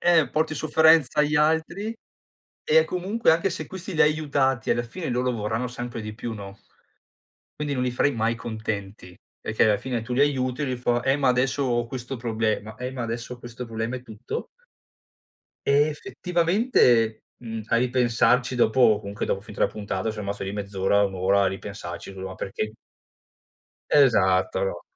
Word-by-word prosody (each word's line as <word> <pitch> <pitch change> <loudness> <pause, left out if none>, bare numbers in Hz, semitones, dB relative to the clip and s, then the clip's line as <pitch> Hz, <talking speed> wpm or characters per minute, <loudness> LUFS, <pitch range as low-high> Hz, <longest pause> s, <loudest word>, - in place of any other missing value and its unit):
Eh, 165 -7 +4
porti 155 0 0
sofferenza 155 -1 +4
agli 150 0 +3
altri 160 +8 +1 0.7
e 475 0 +5
comunque 190 +2 +1
anche 170 +4 +1
se 180 - -5
questi 190 0 -7
li 160 - +4
hai 150 0 +5
aiutati 135 -5 0
alla 120 - +2
fine 160 +8 -6
loro 125 +1 0
vorranno 110 +2 -2
sempre 120 -1 -6
di 105 0 -6
più, 115 +1 -5
no? 100 -1 -9 1.0
Quindi 145 -1 -1
non 125 - -1
li 125 - +1
farai 130 +3 +1
mai 115 +1 0
contenti, 105 -5 -6 0.2
perché 110 - +1
alla 105 -2 +4
fine 120 -2 -3
tu 125 - -4
li 125 - 0
aiuti, 130 -1 +1
e - - 0
lui 130 -1 -2
fa: 120 0 0
"Eh, 135 +2 +2
ma 135 -3 +3
adesso 130 +3 +1
ho 120 -2 0
questo 125 +2 -5
problema, 110 -2 -2
eh, 125 +1 -5
ma 130 -2 -5
adesso 120 +2 -5
questo 120 +1 -8
problema" 115 +2 -3
e 125 - -8
tutto 110 -3 -6 1.2
e, 145 +2 +5
effettivamente, 165 - +2 0.2
mhmm, 115 -2 -6
a 115 - +2
ripensarci 125 +1 +2
dopo 115 -2 +4
comunque 100 +1 -4
dopo 95 - -1
finito 105 - -7
la - - +4
puntata 100 -1 -3
son 105 -1 -6
rimasto 100 0 -4
lì 95 - -4
mezz'ora, 100 0 +1
un'ora 95 +1 +2
a - - +3
ripensarci, 95 -1 -6
lu 95 0 -7
ma 95 - -7
perché 110 +2 -4 1.2
Esatto, 95 -9 +4
no. 85 -2 -4
120 Hz, 175 wpm, -25 LUFS, 110-145 Hz, 1.2 s, e